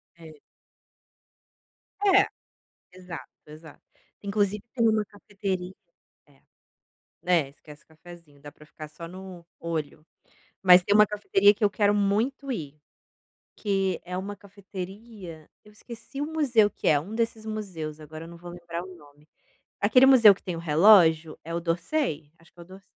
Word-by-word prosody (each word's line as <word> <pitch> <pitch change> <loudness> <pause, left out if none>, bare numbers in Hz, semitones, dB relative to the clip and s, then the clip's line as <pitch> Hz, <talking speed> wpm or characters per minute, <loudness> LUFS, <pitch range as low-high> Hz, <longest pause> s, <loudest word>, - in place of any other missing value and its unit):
É. 160 -2 -14 1.7
É, 395 0 +5 0.7
exato, 180 -2 -10 0.2
exato. 155 0 -14 0.4
Inclusive 205 0 -1
tem 230 -3 +2
uma 215 -1 +1
cafeteria 195 -3 -5 0.5
é, 140 -2 -26 0.8
né, 170 -6 +2
esquece 150 +1 -16
o - - -54
cafezinho, 160 -3 -16
dá 145 - -11
pra 150 - -18
ficar 155 0 -11
só 165 +2 -10
no 185 -1 -11 0.2
olho. 160 -2 -5 0.6
Mas 180 -1 +7
tem 200 +2 +1
uma 210 0 +7
cafeteria 205 0 +3
que 215 - -2
eu 205 - +3
quero 205 0 +2
muito 225 +8 0
ir, 150 - -7 0.8
que 195 -3 -1
é 180 +1 -5
uma 200 +2 -5
cafeteria, 195 -3 -10 0.2
eu 210 - -17
esqueci 235 +6 -10
o - - -1
museu 250 -9 +3
que - - -6
é, 150 -3 +4
um 195 +9 -9
desses 225 -1 -2
museus, 175 -8 -6
agora 155 +1 -10
eu 165 - -11
não 170 - -12
vou 175 0 -10
lembrar 170 -1 -7
o 185 0 -11
nome, 150 -1 -20 0.5
aquele 250 +6 +5
museu 230 -7 +8
que - - -21
tem 180 -3 -5
o - - -6
relógio, 165 -1 +4
é 165 +1 -6
o 170 - -1
d'Orsay? 165 - -2
Acho 165 - -24
que 175 - -17
é - - -9
o - - -14
d'Or 190 +1 -14
185 Hz, 160 wpm, -26 LUFS, 165-210 Hz, 1.7 s, museu